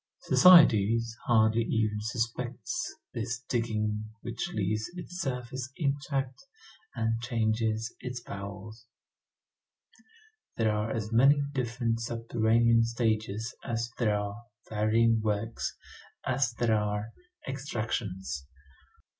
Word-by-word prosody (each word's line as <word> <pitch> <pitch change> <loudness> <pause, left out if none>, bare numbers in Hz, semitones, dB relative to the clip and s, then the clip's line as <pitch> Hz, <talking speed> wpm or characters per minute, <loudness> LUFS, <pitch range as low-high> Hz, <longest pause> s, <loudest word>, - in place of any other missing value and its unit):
Society 115 - +7 0.3
hardly 110 0 +4
even 110 -2 0
suspects 120 - -3 0.2
this 115 +1 -3
digging 110 -4 -1 0.2
which 120 0 -4
leaves 105 +1 -1
its 180 +1 -6
surface 130 -2 -4
intact 140 - -2 0.5
and 115 0 0
changes 110 -1 0
its 125 -1 -5
bowels. 105 +2 -8 1.7
There 110 -2 +2
are 105 +1 -1
as 110 -1 -3
many 140 +5 +5
different 120 -3 -1
subterranean 115 0 +2
stages 115 -1 -1
as 115 0 -2
there 105 -4 +2
are 105 +2 -5 0.3
varying 110 +1 +2
works, 110 +1 -2 0.5
as 130 -2 +1
there 115 -1 +1
are 105 +1 -1 0.4
extractions. 105 - -3
115 Hz, 95 wpm, -29 LUFS, 110-120 Hz, 1.7 s, Society